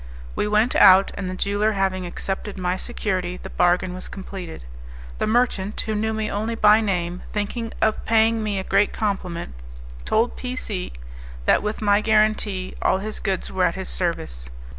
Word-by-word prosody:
We - - 0
went 215 +4 +2
out, 190 +1 +7
and 190 -2 -4
the 185 - -4
jeweller 205 +3 +1
having 190 -2 -1
accepted 195 +3 -4
my 180 -1 0
security 185 -4 -3
the - - -9
bargain 180 +1 +2
was 185 - -7
completed. 185 - -8 0.5
The - - 0
merchant, 215 -3 +1
who 220 - -3
knew 220 +1 0
me 220 -1 -2
only 220 +3 -2
by 215 0 +6
name, 180 -4 -1
thinking 225 +2 -3
of 220 0 +1
paying 225 0 +3
me 210 -2 -1
a 190 - -2
great 205 - +2
compliment, 185 - -3 0.5
told 225 - +1
P 250 0 -5
C 200 - -4 0.5
that - - +4
with 210 +1 -3
my 205 0 +4
guarantee 215 -3 +1
all - - +3
his 215 +2 -5
goods 190 -3 -2
were - - +2
at - - 0
his - - -4
service. - - -3
205 Hz, 175 wpm, -23 LUFS, 185-215 Hz, 0.5 s, out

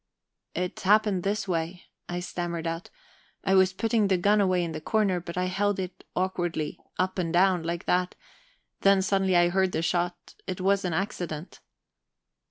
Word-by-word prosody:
"It 180 +1 -2
happened 205 -1 +3
this 200 +2 -1
way," 170 0 -2 0.3
I 175 0 -2
stammered 175 -2 -4
out. 165 +1 -3 0.5
"I 190 - +2
was 190 0 +5
putting 220 +2 +1
the 190 -1 +3
gun 205 +4 +3
away 185 -2 +2
in 170 - -3
the 155 -1 -5
corner, 205 -3 +1
but 170 0 -8
I 180 - +1
held 200 +2 0
it 185 -1 -6
awkwardly 175 -4 -1 0.2
up 185 +1 0
and 170 -2 -1
down, 180 0 +4
like 170 +1 -3
that; 180 0 +1 0.6
then 195 -1 +4
suddenly 195 -1 +2
I 175 0 +5
heard 190 0 +1
the 165 - 0
shot. 175 +1 -1
It 185 -1 -3
was 195 +1 +2
an 175 - -1
accident." 175 -2 -4
185 Hz, 175 wpm, -27 LUFS, 175-195 Hz, 0.6 s, was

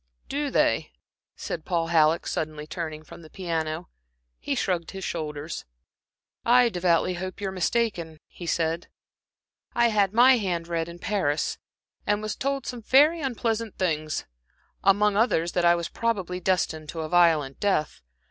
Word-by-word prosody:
"Do 290 +1 -1
they?" - - +1 0.4
said 160 - -5
Paul 165 -1 -1
Halleck, 160 -1 +3
suddenly 155 -1 -3
turning 155 -1 -5
from 155 - -12
the 160 - -13
piano. 165 -1 -3 0.5
He - - -2
shrugged 175 -3 -1
his 190 -1 -7
shoulders. 155 -2 -4 0.8
"I 245 0 +5
devoutly 180 -2 +1
hope 185 +2 -6
you 200 -2 -2
are - - -5
mistaken," 180 -3 -1
he 175 - -10
said. 165 +1 0 0.5
" - - -44
read 215 -5 +3
my 250 +4 +6
hand 175 -6 -2
in 170 +1 -2
Paris, 175 -6 -1 0.5
and 205 +1 +1 0.2
told 275 0 -1
me - - -8
some 245 -2 -5
very 295 +8 +5
unpleasant 230 -4 -2
things; 155 -4 -1 0.6
among 205 +1 +4
others 175 -7 +2
that 175 -1 +1
I 170 0 +6
was 170 -1 -3
probably 195 -6 -2
destined 170 -4 0
to 165 - -4
a 155 - -3
violent 160 -5 +3
death. 195 -7 0
175 Hz, 150 wpm, -26 LUFS, 160-210 Hz, 0.8 s, my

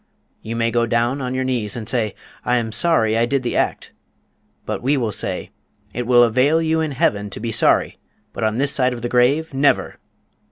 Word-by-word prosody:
_ - - -41 0.4
You 115 +1 -6
may 115 0 0
go 120 0 +1
down 120 +4 0
on 125 0 -3
your 130 - -1
knees, 120 -6 -1
and 115 -3 -6
say, 115 -5 0 0.3
'I 125 - +1
am 115 -2 -2
sorry 115 -3 +2
I 115 +1 +2
did 135 0 -1
the 120 - -2
act' - - -1 0.7
but - - -4
we 140 +4 +1
will 115 -4 -1
say - - -3 0.4
'_IT 120 +1 -3
WILL 120 -1 +6
AVAIL 130 +7 +3
YOU 160 0 +1
IN 155 -3 -2
HEAVEN 105 -9 0
TO 100 - -7
BE 115 +1 -4
SORRY, 110 - +2 0.3
BUT - - -5
ON 110 0 0
THIS 140 +2 +1
SIDE 130 -2 +2
OF 120 - -10
THE 120 - -2
GRAVE, 135 +6 +2
NEVER! 140 +1 +1
120 Hz, 215 wpm, -20 LUFS, 115-135 Hz, 0.7 s, WILL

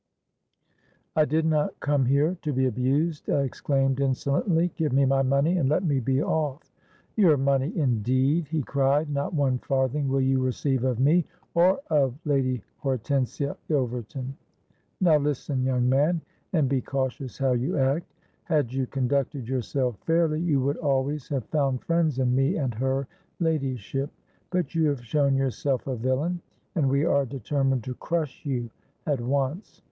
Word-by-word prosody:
'—'I 155 - +4
did 155 +2 +1
not 155 -2 0
come 145 -2 +1
here 145 +7 +2
to 150 - -2
be 130 -1 +1
abused,' 135 +6 0
I 140 - +2
exclaimed 135 0 0
insolently: 140 +6 +1
'give 160 -3 0
me 135 +1 +4
my 135 0 +3
money, 140 +6 +2
and 135 -5 +2
let 155 +5 +2
me 145 -6 +1
be 130 +3 +1
off.'—'Your 155 +3 -1
money, 135 +3 +1
indeed!' 130 +4 +1
he 155 0 -1
cried: 140 +3 +1
'not 140 +4 -2
one 135 -4 +1
farthing 135 +2 0
will 135 +1 +1
you 130 0 +2
receive 130 0 0
of 125 -3 0
me, 155 +7 +4 0.3
or 180 +7 +4
of 135 -5 +2
Lady 130 -4 0 0.2
Hortensia 135 +1 -1
Ilverton. 125 -2 -2 0.7
Now, 170 -5 +5
listen, 145 -2 -1
young 125 -1 +1
man, 150 +6 +2 0.3
and 155 -6 +2
be 130 -1 +1
cautions 130 -1 -3
how 135 -1 +1
you 125 +3 0
act. 140 +5 0 0.3
Had 150 -7 0
you 130 -1 -1
conducted 135 -1 -1
yourself 125 -2 -1
fairly, 165 -1 +2
you 160 -5 +2
would 140 +2 0
always 140 -1 -1
have 135 -5 -2
found 135 -4 0
friends 165 -5 +1
in 125 -1 +2
me 135 +7 +2
and 135 -6 -1
her 130 +3 -1 0.3
ladyship; 135 - -1 0.4
but 180 -1 -1
you 165 -2 +2
have 140 -5 -2
shown 140 +3 +2
yourself 135 0 -1
a 130 - -2
villain, 130 +9 -1 0.3
and 150 -7 +1
we 140 +3 +2
are 140 -4 +2
determined 135 0 -1
to 130 - -4
crush 155 0 -3
you 120 -4 -2 0.3
at 145 -5 0
once. 140 - -2
135 Hz, 160 wpm, -26 LUFS, 130-150 Hz, 0.7 s, Now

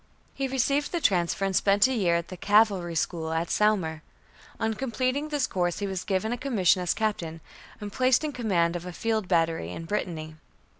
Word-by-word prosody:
He 270 0 -2
received 275 +3 0
the 345 - -1
transfer 185 - +1
and 195 -1 -1
spent 200 +2 +4
a 260 - +1
year 185 -8 +2
in 170 0 -1
the 185 - -8
Cavalry 195 -3 +2
School 160 0 -2
at 165 +1 -1
Saumur. 185 -7 +1 0.6
On 220 0 0
completing 255 +5 -1
this 295 -3 0
course 175 -2 -1
he 205 - -2
was 190 -2 -3
given 210 +4 -1
a 245 - -4
commission 205 -9 +2
as 180 - 0
Captain, 175 -7 -2 0.4
and 205 -1 -7
placed 255 +2 +3
in 305 - -1
command 185 -10 0
of 175 +1 -5
a 180 - -6
field 220 -1 -1
battery, 165 - +1
in 165 - -7
Brittany. 160 -5 -4
195 Hz, 195 wpm, -27 LUFS, 170-235 Hz, 0.6 s, spent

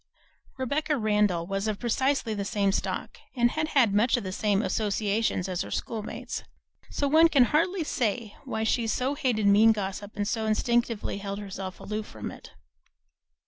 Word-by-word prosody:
Rebecca 290 +4 0
Randall 210 -6 +1
was 195 +3 -2
of 215 -2 -1
precisely 255 0 0
the 205 -1 -2
same 200 0 +1
stock, - - -3 0.2
and 240 -1 +3
had 310 0 -1
had 255 -9 +3
much 220 +4 +3
the 200 -6 -3
same 205 +1 +1
associations 205 0 0
as 180 -2 -2
her - - -5
schoolmates, 220 -2 -4 0.5
so 285 - -1
one 320 +3 +6
can 275 -5 +5
hardly 335 +7 +1
say 230 -6 -2
why 220 -5 -3
she 225 +1 +1
so 255 +5 0
hated 250 -8 0
mean 210 +3 +6
gossip 205 0 -5
and 205 -1 -1
so 220 0 -1
instinctively 230 -1 0
held 200 0 -4
herself 190 -2 -6
aloof 215 0 -4
from 110 -1 -7
it. - - -12
220 Hz, 165 wpm, -27 LUFS, 200-250 Hz, 0.5 s, one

